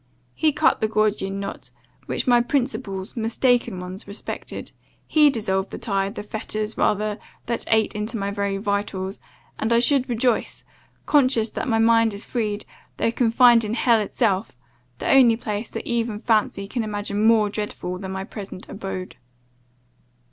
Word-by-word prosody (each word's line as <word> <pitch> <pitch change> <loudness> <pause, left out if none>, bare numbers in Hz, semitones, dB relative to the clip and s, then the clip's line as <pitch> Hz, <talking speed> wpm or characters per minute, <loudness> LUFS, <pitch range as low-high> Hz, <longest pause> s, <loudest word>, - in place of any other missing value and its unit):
He 310 - +2
cut 310 +2 +2
the 220 - +2
Gordian 210 -2 0
knot, 200 0 -6 0.4
which - - -2
my 245 -2 +5
principles, 240 -7 -2
mistaken 235 -2 +1
ones, 180 +2 -7
respected; 200 +1 -6 0.3
he 300 -2 +5
dissolved 190 -6 -1
the - - -7
tie, 195 -2 -1
the 205 0 -7
fetters 215 0 -4
rather, 210 0 0 0.3
that 235 0 -2
ate 220 -1 +2
into 215 +2 -3
my 200 -1 -2
very 200 -1 -1
vitals 200 -1 -2 0.4
and 220 - -1
I 235 - +5
should 260 +2 +3
rejoice, 240 0 0 0.4
conscious 255 -6 +3
that - - -4
my 225 -3 +2
mind 225 -1 +4
is 200 - -5
freed, 215 -4 -2 0.3
though 230 - +1
confined 235 0 +5
in 215 +1 -2
hell 235 -1 +4
itself, 205 - -1 0.4
the - - -4
only 250 -4 +6
place 215 -1 -4
that - - -6
even 230 -2 -1
fancy 215 -3 0
can 235 +2 -2
imagine 205 -1 -2
more 220 -1 +5
dreadful 180 -4 -4
than 190 -1 -6
my 190 0 -3
present 195 -2 -9
abode. 190 -2 -6
215 Hz, 155 wpm, -23 LUFS, 200-235 Hz, 0.4 s, only